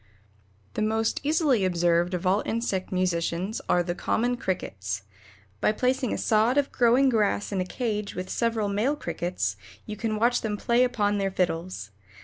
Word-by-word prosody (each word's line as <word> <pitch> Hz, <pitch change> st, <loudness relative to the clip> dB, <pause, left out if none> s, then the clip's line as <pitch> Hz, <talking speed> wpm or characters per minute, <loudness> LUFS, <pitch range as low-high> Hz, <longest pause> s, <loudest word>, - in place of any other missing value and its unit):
The -, -, -2 dB
most 220 Hz, +1 st, +1 dB
easily 290 Hz, -, +2 dB
observed 175 Hz, 0 st, +2 dB
of 180 Hz, +1 st, -4 dB
all 190 Hz, +3 st, +3 dB
insect 220 Hz, -5 st, -2 dB
musicians 180 Hz, +2 st, -1 dB
are 175 Hz, -, +3 dB
the 175 Hz, 0 st, -2 dB
common 240 Hz, +7 st, 0 dB
Crickets. 100 Hz, -, -3 dB, 0.6 s
By -, -, +3 dB
placing 255 Hz, +1 st, 0 dB
a -, -, -1 dB
sod 225 Hz, +4 st, +2 dB
of 285 Hz, -1 st, +2 dB
growing 245 Hz, +3 st, +4 dB
grass 210 Hz, -4 st, +1 dB
in 195 Hz, -2 st, 0 dB
a -, -, -1 dB
cage 210 Hz, -1 st, -3 dB
with 185 Hz, 0 st, -4 dB
several 225 Hz, 0 st, 0 dB
male 215 Hz, +9 st, +1 dB
crickets, 170 Hz, -, -3 dB, 0.3 s
you 210 Hz, -, -5 dB
can 220 Hz, 0 st, -2 dB
watch 240 Hz, +3 st, +2 dB
them 210 Hz, -2 st, -2 dB
play 235 Hz, +4 st, +3 dB
upon 205 Hz, -5 st, +1 dB
their 195 Hz, 0 st, +1 dB
fiddles. 175 Hz, -, -2 dB
210 Hz, 165 wpm, -26 LUFS, 180-235 Hz, 0.6 s, growing